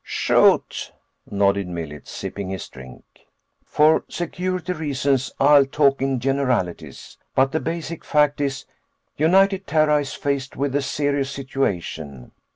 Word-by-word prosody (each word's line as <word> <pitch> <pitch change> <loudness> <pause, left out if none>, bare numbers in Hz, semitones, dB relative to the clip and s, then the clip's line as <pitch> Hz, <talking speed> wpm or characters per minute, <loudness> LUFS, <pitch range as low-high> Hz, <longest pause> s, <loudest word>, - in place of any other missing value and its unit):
"Shoot," - - +2 0.4
nodded 100 -1 +1
Millet, 80 -4 -7
sipping 100 -2 -6
his 95 0 -5
drink. 65 0 -13 0.6
"For 155 +1 +3
security 180 +1 -3
reasons, 140 -4 -1
I'll 140 0 +6
talk 140 -1 +2
in 135 -1 0
generalities. 120 - -2 0.2
But 135 +1 +3
the 160 - 0
basic 165 0 -5
fact 150 -1 +2
is, 135 -1 -2 0.5
United 190 +5 +3
Terra 150 0 +3
is 145 -2 -3
faced 140 -1 -3
with 140 0 -2
a 145 - +2
serious 140 0 -1
situation. 85 - -4
140 Hz, 125 wpm, -22 LUFS, 100-150 Hz, 0.6 s, I'll